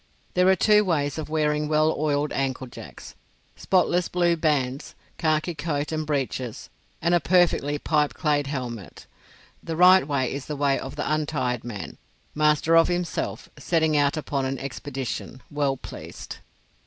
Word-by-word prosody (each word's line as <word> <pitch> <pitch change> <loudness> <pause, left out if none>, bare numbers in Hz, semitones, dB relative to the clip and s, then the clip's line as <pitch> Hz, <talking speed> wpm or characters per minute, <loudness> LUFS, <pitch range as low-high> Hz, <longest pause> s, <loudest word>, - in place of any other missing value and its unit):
There 180 0 +3
are 190 - +6
two 210 +3 +4
ways 150 -5 0
of 155 - -5
wearing 150 -1 +1
well 155 +1 +3
oiled 150 0 0
ankle 135 -1 -2
jacks, 120 - -11 0.4
spotless 180 -2 +2
blue 175 -1 +2
bands, 145 -5 -1 0.2
khaki 155 +2 +1
coat 150 -1 -3
and 155 -1 -2
breeches, 130 -5 -3 0.3
and 170 +1 +2
a 175 - +5
perfectly 165 -3 +2
pipeclayed 150 -1 +1
helmet. 120 - -6 0.6
The 165 - -4
right 180 -1 +6
way 140 -4 0
is 140 -1 -6
the 150 - -3
way 140 -1 +1
of 135 - -7
the - - -3
untired 140 -6 -1
man, 110 -5 -7 0.3
master 150 +2 +3
of 165 0 +6
himself, 175 -1 -2
setting 160 -2 +1
out 145 0 +2
upon 140 -2 -2
an 135 +1 -3
expedition, 135 -2 -5
well 145 -2 0
pleased. - - -9
150 Hz, 150 wpm, -25 LUFS, 135-165 Hz, 0.6 s, are